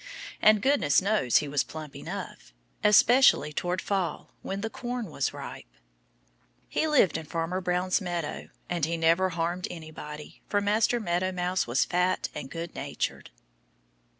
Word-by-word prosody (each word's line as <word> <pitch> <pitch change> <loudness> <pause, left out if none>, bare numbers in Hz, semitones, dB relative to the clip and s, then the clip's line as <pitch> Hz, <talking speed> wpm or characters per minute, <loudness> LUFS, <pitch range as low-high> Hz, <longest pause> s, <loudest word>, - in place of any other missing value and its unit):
And 215 -1 +5
goodness 265 - +4
knows 195 - +2
he 150 - 0
was 140 0 +1
plump 155 -2 -9
enough - - -7 0.3
especially 210 - +5
toward 175 +3 -2
fall 195 -4 -2
when 195 +1 -4
the 225 - -2
corn 245 -6 -5
was 140 - -1
ripe. - - -9 1.0
He 315 - 0
lived 285 - +3
in 160 - -10
Farmer 165 +4 -2
Green's 180 +2 +1
meadow. 175 -4 -4 0.2
And 175 -3 -3
he 165 +1 -2
never 165 +3 +3
harmed 175 +1 -2
anybody. 155 -2 -9
For 205 - +1
Master 215 +4 +2
Meadow 185 -2 0
Mouse 180 -2 -1
was 120 +3 +2
fat 180 +1 0
and 135 - -6
good 165 0 -6
natured. - - -4
180 Hz, 150 wpm, -28 LUFS, 160-205 Hz, 1.0 s, And